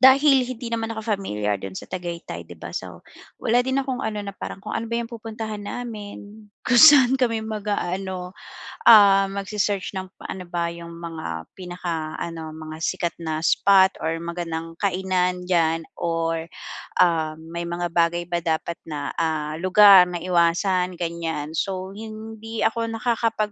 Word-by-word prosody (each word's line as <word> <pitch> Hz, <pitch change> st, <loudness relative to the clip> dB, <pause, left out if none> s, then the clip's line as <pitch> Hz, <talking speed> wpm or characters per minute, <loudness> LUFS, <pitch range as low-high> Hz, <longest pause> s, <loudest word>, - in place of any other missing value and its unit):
dahil 265 Hz, 0 st, +6 dB
hindi 245 Hz, -1 st, -6 dB
naman 225 Hz, -1 st, -2 dB
ako 220 Hz, -, -5 dB, 0.2 s
familiar 105 Hz, -, -2 dB
do'n 95 Hz, 0 st, -7 dB
sa -, -, -8 dB
Tagaytay 170 Hz, -, -6 dB
'di 85 Hz, -, -12 dB
ba? -, -, -7 dB
So 90 Hz, -2 st, -6 dB, 0.4 s
wala 245 Hz, +2 st, +2 dB
din 265 Hz, +1 st, +1 dB
akong 265 Hz, -1 st, -3 dB
ano, 215 Hz, -1 st, -2 dB
na 200 Hz, -1 st, -6 dB
parang -, -, -7 dB
kung -, -, -7 dB
ano -, -, -3 dB
ba 235 Hz, -, -1 dB
'yung 235 Hz, -, -5 dB
pupuntahan 220 Hz, -2 st, -6 dB
namin, 210 Hz, -2 st, -7 dB, 0.2 s
kung 245 Hz, -, +2 dB
saan 270 Hz, -4 st, +8 dB
kami 230 Hz, -3 st, +1 dB
mag-aano, 195 Hz, -4 st, -3 dB, 0.6 s
ah, 200 Hz, -3 st, +8 dB
mag-se-search 200 Hz, 0 st, -2 dB
ng 185 Hz, -, -7 dB, 0.2 s
ano 185 Hz, -, -6 dB
ba 170 Hz, -1 st, -2 dB
'yung 170 Hz, 0 st, -9 dB
mga 160 Hz, -, -6 dB
pinaka-ano 165 Hz, -3 st, -5 dB
mga 155 Hz, 0 st, -8 dB
sikat 175 Hz, -2 st, -1 dB
na 160 Hz, -1 st, -3 dB
spot 190 Hz, +3 st, +4 dB
or 160 Hz, +1 st, 0 dB
magandang 165 Hz, -1 st, -5 dB
kainan 180 Hz, -2 st, 0 dB
diyan 165 Hz, -2 st, +2 dB, 0.2 s
or, 165 Hz, -1 st, -1 dB, 0.6 s
ah, 160 Hz, -3 st, +1 dB
may 170 Hz, +1 st, -6 dB
mga 175 Hz, +1 st, -2 dB
bagay 170 Hz, 0 st, +2 dB
ba 175 Hz, -1 st, -1 dB
dapat 165 Hz, +1 st, -1 dB
na, 145 Hz, -3 st, -4 dB
ah, 155 Hz, -2 st, -1 dB
lugar 185 Hz, 0 st, +8 dB
na 175 Hz, -1 st, -5 dB
iwasan 180 Hz, +1 st, +2 dB
ganiyan. 165 Hz, -3 st, -3 dB
So 190 Hz, -1 st, -2 dB
hindi 220 Hz, +1 st, -6 dB
ako 230 Hz, +1 st, +1 dB
nakakapag, 225 Hz, -2 st, 0 dB
180 Hz, 155 wpm, -23 LUFS, 165-215 Hz, 0.6 s, saan